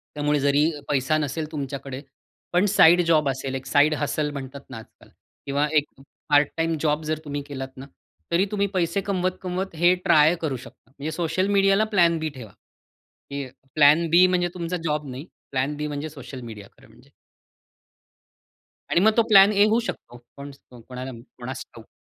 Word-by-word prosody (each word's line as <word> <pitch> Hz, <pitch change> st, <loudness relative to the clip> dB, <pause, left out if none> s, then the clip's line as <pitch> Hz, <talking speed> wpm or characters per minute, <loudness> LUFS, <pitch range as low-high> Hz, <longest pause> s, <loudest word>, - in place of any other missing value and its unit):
त्यामुळे 150 Hz, 0 st, 0 dB
जरी 145 Hz, +3 st, +3 dB, 0.2 s
पैसा 145 Hz, +2 st, +1 dB
नसेल 155 Hz, +2 st, -3 dB
तुमच्याकडे, 140 Hz, -2 st, -6 dB, 0.5 s
पण 180 Hz, +3 st, +3 dB
साइड 175 Hz, -2 st, +6 dB
जॉब 155 Hz, -4 st, +3 dB
असेल, 135 Hz, 0 st, -4 dB
एक 130 Hz, 0 st, -6 dB
साइड 145 Hz, +3 st, +3 dB
हसल 150 Hz, +1 st, -1 dB
म्हणतात 140 Hz, 0 st, -8 dB
ना -, -, -8 dB
आजकाल 110 Hz, -, -15 dB, 0.4 s
किंवा 145 Hz, +2 st, 0 dB
एक 145 Hz, -, +3 dB, 0.4 s
पार्ट 145 Hz, -1 st, +4 dB
टाईम 165 Hz, -1 st, 0 dB
जॉब 155 Hz, 0 st, 0 dB
जर 155 Hz, 0 st, -2 dB
तुम्ही 145 Hz, -1 st, -4 dB
केलात 135 Hz, -2 st, -7 dB
ना, 135 Hz, -, -8 dB, 0.5 s
तरी 180 Hz, +4 st, +3 dB
तुम्ही 200 Hz, -1 st, 0 dB
पैसे 180 Hz, +1 st, 0 dB
कमवत-कमवत 185 Hz, -1 st, -3 dB
हे 175 Hz, +3 st, +4 dB
ट्राय 160 Hz, -1 st, +5 dB
करू 140 Hz, -5 st, -2 dB
शकता. 125 Hz, -1 st, -15 dB
म्हणजे 150 Hz, +3 st, -4 dB
सोशल 170 Hz, +3 st, -1 dB
मीडियाला 195 Hz, +2 st, +4 dB
प्लॅन-बी 170 Hz, -4 st, +3 dB
ठेवा. 110 Hz, -6 st, -10 dB, 0.8 s
की 140 Hz, -1 st, -4 dB, 0.3 s
प्लॅन-बी 165 Hz, +4 st, +5 dB
म्हणजे 180 Hz, -1 st, +1 dB
तुमचा 175 Hz, 0 st, -3 dB
जॉब 150 Hz, -2 st, -2 dB
नाही. 130 Hz, +4 st, -7 dB, 0.3 s
प्लॅन-बी 145 Hz, +3 st, -2 dB
म्हणजे 145 Hz, +1 st, -5 dB
सोशल 130 Hz, -3 st, -10 dB
मीडिया 110 Hz, -4 st, -10 dB
खरं -, -, -19 dB
म्हणजे. -, -, -21 dB, 1.8 s
आणि 170 Hz, -, +3 dB
मग 220 Hz, +3 st, +5 dB
तो 230 Hz, -, +5 dB
प्लॅन-ए 200 Hz, +1 st, +7 dB
होऊ 225 Hz, +2 st, +2 dB
शकतो. 120 Hz, -, -7 dB, 0.2 s
कोण 140 Hz, +1 st, -8 dB
स्तो 125 Hz, -3 st, -17 dB
कोणाला 130 Hz, +1 st, -7 dB
माहित, 115 Hz, +1 st, -12 dB
कोणास 130 Hz, +1 st, -6 dB
ठाऊक? 115 Hz, -, -14 dB
150 Hz, 165 wpm, -24 LUFS, 135-170 Hz, 1.8 s, प्लॅन-ए